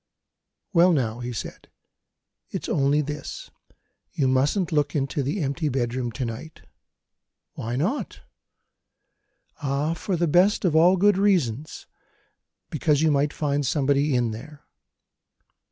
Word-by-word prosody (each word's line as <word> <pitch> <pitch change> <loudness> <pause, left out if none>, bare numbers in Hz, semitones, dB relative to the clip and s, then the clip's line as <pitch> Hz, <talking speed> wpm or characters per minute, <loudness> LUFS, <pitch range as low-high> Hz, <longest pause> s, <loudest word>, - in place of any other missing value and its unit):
"Well, 175 0 +5
now," 120 -6 -1
he 125 0 -4
said, 115 - -7 0.8
"it's - - -5
only 140 +1 +2
this 150 0 -6 0.6
you 135 - +1
mustn't 145 +8 +1
look 150 -1 0
into 140 +1 -1
the 145 +9 -2
empty 145 +3 -1
bedroom 125 -1 -2
to 125 +4 -3
night." 115 +8 -8 0.9
"Why 115 +2 -4
not?" 185 - -2 1.4
"Ah, 145 +3 0
for 180 +3 -3
the 170 0 +1
best 185 +6 +3
of 165 -4 +2
all 175 +4 +5
good 200 +1 +4
reasons! 155 - 0 0.9
Because 150 0 +1
you 160 - +4
might 145 +1 +2
find 145 -1 -1
somebody 140 +1 +1
in 120 -2 +1
there." 140 +7 -10
145 Hz, 125 wpm, -24 LUFS, 130-165 Hz, 1.4 s, Well